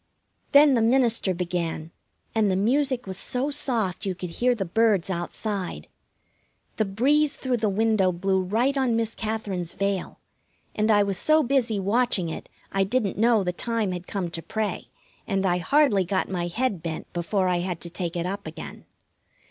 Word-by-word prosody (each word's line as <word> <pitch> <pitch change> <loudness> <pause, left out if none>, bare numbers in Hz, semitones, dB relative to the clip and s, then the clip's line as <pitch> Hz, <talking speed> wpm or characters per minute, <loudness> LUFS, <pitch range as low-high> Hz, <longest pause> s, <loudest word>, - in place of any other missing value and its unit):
Then 285 0 +7
the 235 - +3
minister 230 -4 +3
began, 170 -3 -3 0.4
and 220 -2 +2
the 185 - +1
music 255 +5 +1
was 190 -1 -5
so 260 +4 0
soft 230 -10 -1
you 190 -2 -1
could 180 -1 -6
hear 245 +7 +1
the 195 -4 -3
birds 200 -1 +2
outside. 190 +2 -4 0.9
The 220 - +2
breeze 275 +9 +2
through 255 -2 -1
the 215 -2 0
window 210 -2 +2
blew 190 +2 0
right 230 +9 +1
on 260 -4 +1
Miss 225 -1 -1
Katherine's 210 -6 -3
veil, 195 -1 -2 0.6
and 215 +1 0
I 205 -1 +5
was 195 -3 -1
so 310 0 +4
busy 240 -5 +1
watching 200 -3 +1
it 160 - -7 0.2
I 195 0 +2
didn't 205 0 -1
know 225 -2 +4
the 180 -1 -1
time 225 0 -1
had 180 0 -6
come 185 -4 -3
to 165 - -3
pray, 215 +4 -3 0.4
and 195 -2 0
I 180 -1 +2
hardly 250 -2 +3
got 185 +1 -1
my 175 -2 -2
head 210 -1 -1
bent 160 -1 -6
before 185 +3 0
I 180 -1 +1
had 175 -1 -3
to 170 - -6
take 175 -1 -3
it 170 0 -2
up 195 +2 -4
again. - - -9
200 Hz, 180 wpm, -25 LUFS, 180-235 Hz, 0.9 s, Then